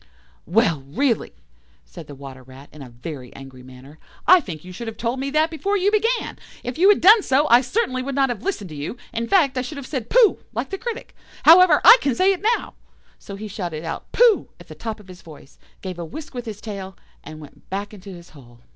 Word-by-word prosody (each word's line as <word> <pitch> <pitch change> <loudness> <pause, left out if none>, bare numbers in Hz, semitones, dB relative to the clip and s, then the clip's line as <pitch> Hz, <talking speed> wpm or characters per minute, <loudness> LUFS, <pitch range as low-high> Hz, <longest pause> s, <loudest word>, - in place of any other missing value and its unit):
"Well, 175 - +1
really," 240 - -1 0.5
said 165 -4 -12
the 145 - -10
Water 135 -1 -11
rat, 130 +2 -15
in 150 - -13
a 130 - -10
very 125 +1 -9
angry 135 -1 -12
manner, 130 +4 -15 0.3
"I 370 +2 +7
think 175 - -9
you 185 - -10
should 230 +6 -8
have 220 -1 -7
told 240 +2 -3
me 275 +1 -3
that 310 +3 +1
before 400 +6 -1
you 395 +2 +1
began. 455 +3 -1 0.2
If 250 +4 -6
you 380 +3 +6
had 415 - +4
done 425 +5 +7
so, 285 -2 +1
I 240 +1 +7
certainly 260 - -2
would 270 +1 -5
not 270 -1 +2
have 240 - -4
listened 220 - -4
to - - -8
you; 145 +11 -6 0.2
in 230 0 -3
fact, 280 -8 +2
I - - 0
should 285 +4 -7
have 280 - -7
said 260 -5 -5
'Pooh,' 470 -4 +4
like - - -4
the 390 - -4
critic. 475 0 -7 0.3
However, 335 -1 +7
I - - +10
can 275 -4 0
say 380 +8 +3
it 370 - -7 0.2
now"; - - -11 0.5
so 200 - -9
he 215 +2 -7
shouted 175 -6 -6
out 165 - -7
"Pooh" 470 -4 +3
at - - -16
the - - -8
top 225 -2 -6
of 205 - -17
his 185 -1 -13
voice, 150 -3 -16 0.2
gave 185 -2 -6
a - - -4
whisk 290 - -9
with 245 -1 -6
his 210 -2 -7
tail, 195 -3 -8 0.3
and 155 +1 -10
went 150 -2 -16
back 200 +2 -5
into 200 -1 -12
his 175 -2 -12
hole. 120 -5 -17
225 Hz, 235 wpm, -21 LUFS, -, 0.5 s, I